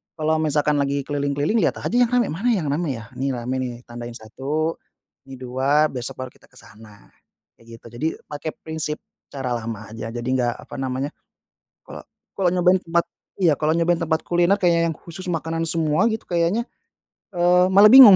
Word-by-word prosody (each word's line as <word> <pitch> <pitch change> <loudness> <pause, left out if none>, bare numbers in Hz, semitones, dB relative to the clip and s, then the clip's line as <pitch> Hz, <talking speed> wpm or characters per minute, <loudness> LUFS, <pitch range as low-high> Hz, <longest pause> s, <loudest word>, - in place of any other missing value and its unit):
kalau 155 0 +1
misalkan 150 -1 +2
lagi 140 0 0
keliling-keliling 145 - 0
lihat - - +1
aja - - -1
yang 245 0 +5
rame, 245 -1 +3
mana 195 +10 -2
yang 185 -10 0
rame 150 -3 -1
ya? 115 -1 -10
Nih 135 0 0
rame 125 +2 -3
nih 125 -1 -3
tandain 120 0 -7
1 140 +8 -3 0.5
ini 135 - -8
2 130 +4 +1
besok 130 +1 -3
baru 130 -1 -5
kita - - -23
ke - - -24
sana, 105 -1 -16 0.5
kayak 115 0 -14
gitu. - - -27
Jadi 120 +7 -2 0.2
pakai 150 +1 -5
prinsip 160 -1 -4 0.3
cara 130 -3 -2
lama 110 -2 -6
aja, 115 +1 -6
jadi 120 +1 -5
enggak, 125 -2 +1
apa - - -10
namanya 135 +1 -2 0.8
kalo - - -9 0.3
kalo 190 -2 +1
nyobain 180 +1 +3
tempat 170 0 +1 0.3
iya 170 -6 +4
kalau 155 +1 0
nyobain 170 0 +2
tempat 160 -1 +1
kuliner 175 +3 +3
kayak 170 -3 +3
yang - - -4
khusus 185 +2 -7
makanan 165 0 -2
semua 160 +5 +2
gitu, 220 0 -3
kayaknya, 175 +6 +1 0.7
eee, 180 +1 +4
malah 200 +3 +7
bingung. 250 -7 +11
150 Hz, 180 wpm, -22 LUFS, 130-175 Hz, 0.8 s, bingung